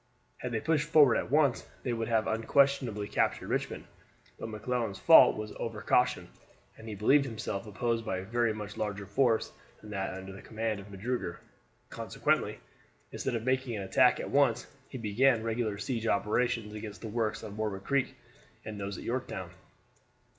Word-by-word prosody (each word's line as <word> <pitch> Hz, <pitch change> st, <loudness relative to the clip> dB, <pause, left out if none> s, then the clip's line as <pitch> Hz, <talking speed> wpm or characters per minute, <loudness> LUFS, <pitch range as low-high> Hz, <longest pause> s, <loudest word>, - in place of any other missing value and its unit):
Had 125 Hz, -, -5 dB
they 115 Hz, -, 0 dB
pushed 150 Hz, +2 st, +1 dB
forward 145 Hz, -6 st, +6 dB
at -, -, -1 dB
once 145 Hz, -2 st, +3 dB, 0.2 s
they 125 Hz, -, -1 dB
would 115 Hz, -1 st, -2 dB
have 110 Hz, -2 st, +2 dB
unquestionably 115 Hz, -2 st, +2 dB
captured -, -, 0 dB
Richmond. -, -, -2 dB, 0.5 s
But -, -, -5 dB
McClellan's 110 Hz, -1 st, -2 dB
fault 165 Hz, -2 st, +7 dB
was 110 Hz, 0 st, -5 dB
over 115 Hz, -2 st, -4 dB
caution, 125 Hz, -, +2 dB, 0.5 s
and 110 Hz, -, -12 dB
he 105 Hz, -, -5 dB
believed 135 Hz, +8 st, +4 dB
himself 110 Hz, -4 st, -4 dB
opposed 115 Hz, +2 st, -1 dB
by 100 Hz, -4 st, -2 dB
a 95 Hz, -, -4 dB
very 120 Hz, +3 st, +1 dB
much 105 Hz, -1 st, -6 dB
larger 105 Hz, -1 st, -3 dB
force 115 Hz, +3 st, +1 dB, 0.3 s
than 105 Hz, -, -11 dB
that 95 Hz, -2 st, -3 dB
under 95 Hz, 0 st, -8 dB
the 95 Hz, -, -10 dB
command 110 Hz, -2 st, -3 dB
of 100 Hz, +1 st, -11 dB
Magruder; 100 Hz, -2 st, -3 dB, 0.5 s
consequently, -, -, -1 dB, 0.5 s
instead 130 Hz, -, -2 dB
of 115 Hz, -, -2 dB
making 130 Hz, -2 st, 0 dB
an 100 Hz, -, -4 dB
attack 125 Hz, +6 st, +4 dB
at -, -, -5 dB
once 130 Hz, -4 st, +3 dB, 0.2 s
he 130 Hz, -, -6 dB
began 115 Hz, +2 st, +2 dB
regular 115 Hz, -2 st, -1 dB
siege 115 Hz, +1 st, -3 dB
operations 110 Hz, +1 st, 0 dB
against 105 Hz, -1 st, -7 dB
the 115 Hz, -, -5 dB
works 110 Hz, 0 st, -2 dB
on 105 Hz, -2 st, -7 dB
Warwick 105 Hz, -3 st, -3 dB
Creek 140 Hz, -2 st, 0 dB, 0.5 s
and 110 Hz, -1 st, -6 dB
those 100 Hz, -1 st, -4 dB
at -, -, -8 dB
Yorktown. 115 Hz, -8 st, -4 dB
110 Hz, 175 wpm, -30 LUFS, 105-125 Hz, 0.5 s, fault